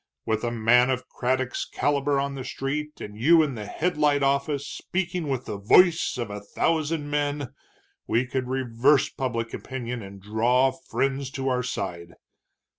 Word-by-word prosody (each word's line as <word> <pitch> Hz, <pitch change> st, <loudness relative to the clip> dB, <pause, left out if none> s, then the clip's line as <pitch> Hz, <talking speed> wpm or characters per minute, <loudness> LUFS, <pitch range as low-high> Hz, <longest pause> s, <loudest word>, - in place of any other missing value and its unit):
With 110 Hz, 0 st, -1 dB
a 120 Hz, -, +1 dB
man 120 Hz, +2 st, +4 dB
of 130 Hz, -1 st, -1 dB
Craddock's 130 Hz, 0 st, -1 dB
caliber 145 Hz, -1 st, 0 dB
on 140 Hz, 0 st, -1 dB
the 135 Hz, -1 st, -5 dB
street, 150 Hz, +4 st, -4 dB
and 105 Hz, -, -8 dB
you 160 Hz, +9 st, +5 dB
in 145 Hz, -3 st, -2 dB
the 105 Hz, -3 st, -6 dB
Headlight 150 Hz, -4 st, +1 dB
office 140 Hz, +1 st, +1 dB
speaking 180 Hz, 0 st, -3 dB
with 130 Hz, -3 st, -2 dB
the 100 Hz, -, -5 dB
voice 165 Hz, -, +4 dB
of 120 Hz, -4 st, -3 dB
a 105 Hz, 0 st, -6 dB
thousand 155 Hz, +6 st, -1 dB
men, 145 Hz, -2 st, -1 dB, 0.5 s
we 120 Hz, +3 st, +2 dB
could 130 Hz, 0 st, -3 dB
reverse 130 Hz, +2 st, +2 dB
public 115 Hz, -3 st, -3 dB
opinion 125 Hz, -2 st, -5 dB
and 100 Hz, -1 st, -10 dB
draw 120 Hz, +6 st, +2 dB
friends 135 Hz, +1 st, -2 dB
to 135 Hz, 0 st, -1 dB
our 125 Hz, -1 st, +1 dB
side. 85 Hz, -8 st, -5 dB
130 Hz, 160 wpm, -25 LUFS, 120-145 Hz, 0.5 s, you